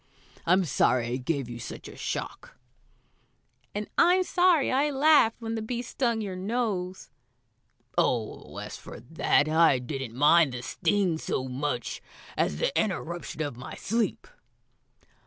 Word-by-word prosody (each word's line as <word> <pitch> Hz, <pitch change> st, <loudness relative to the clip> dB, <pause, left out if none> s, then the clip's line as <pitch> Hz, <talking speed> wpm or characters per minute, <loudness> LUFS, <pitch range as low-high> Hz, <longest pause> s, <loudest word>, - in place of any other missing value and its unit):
"I'm 185 Hz, +2 st, +4 dB
sorry 125 Hz, -4 st, +2 dB
I 125 Hz, -, -1 dB
gave 135 Hz, 0 st, -2 dB
you 120 Hz, -1 st, -7 dB
such 110 Hz, -, -8 dB
a -, -, -11 dB
shock." -, -, -5 dB, 1.2 s
"And 210 Hz, 0 st, -3 dB
I'm 360 Hz, +2 st, +5 dB
sorry 355 Hz, -5 st, +3 dB
I 280 Hz, +3 st, +2 dB
laughed 285 Hz, -5 st, +5 dB
when 225 Hz, -1 st, -4 dB
the 225 Hz, -, -2 dB
bee 240 Hz, +2 st, -3 dB
stung 235 Hz, -2 st, -1 dB
your 195 Hz, -3 st, -4 dB
nose." 190 Hz, -2 st, -3 dB, 0.9 s
"Oh, 115 Hz, -3 st, -1 dB
as -, -, -6 dB
for -, -, -10 dB
that, 155 Hz, +2 st, +1 dB
I 160 Hz, -3 st, +5 dB
didn't 125 Hz, -2 st, -5 dB
mind 145 Hz, +1 st, +5 dB
the 125 Hz, 0 st, -5 dB
sting 180 Hz, +4 st, 0 dB
so 130 Hz, -4 st, -2 dB
much 130 Hz, -1 st, -3 dB, 0.3 s
as 75 Hz, -, 0 dB
the -, -, -1 dB
interruption 175 Hz, -5 st, -2 dB
of 145 Hz, -5 st, -5 dB
my 130 Hz, -, -8 dB
sleep." 230 Hz, +2 st, -1 dB
175 Hz, 140 wpm, -27 LUFS, -, 1.2 s, I'm